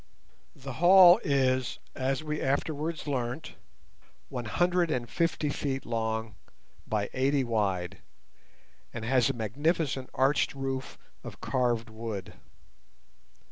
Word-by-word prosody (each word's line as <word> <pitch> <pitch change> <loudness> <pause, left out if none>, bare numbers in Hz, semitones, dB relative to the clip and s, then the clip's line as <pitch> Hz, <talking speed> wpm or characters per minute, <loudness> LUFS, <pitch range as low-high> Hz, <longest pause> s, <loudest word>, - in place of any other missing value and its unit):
The 135 -1 -8
hall 180 +1 +8
is, 130 -3 +1 0.2
as 135 +3 -1
we 150 -1 -3
afterwards 150 +4 -1
learnt, 130 0 -3 0.8
one 120 -2 -5
hundred 175 +8 +1
and 125 -5 -1
fifty 160 +3 0
feet 135 -2 -3
long 110 -1 -2 0.5
by 105 -2 -1
eighty 135 +1 +2
wide, 100 -5 -1 0.9
and 115 -2 -6
has 130 +2 +3
a - - 0
magnificent 135 - -1
arched 135 +2 +2
roof 135 -1 -4 0.3
of - - -9
carved 120 -3 0
wood. 110 -3 -6
130 Hz, 110 wpm, -29 LUFS, 115-145 Hz, 0.9 s, hall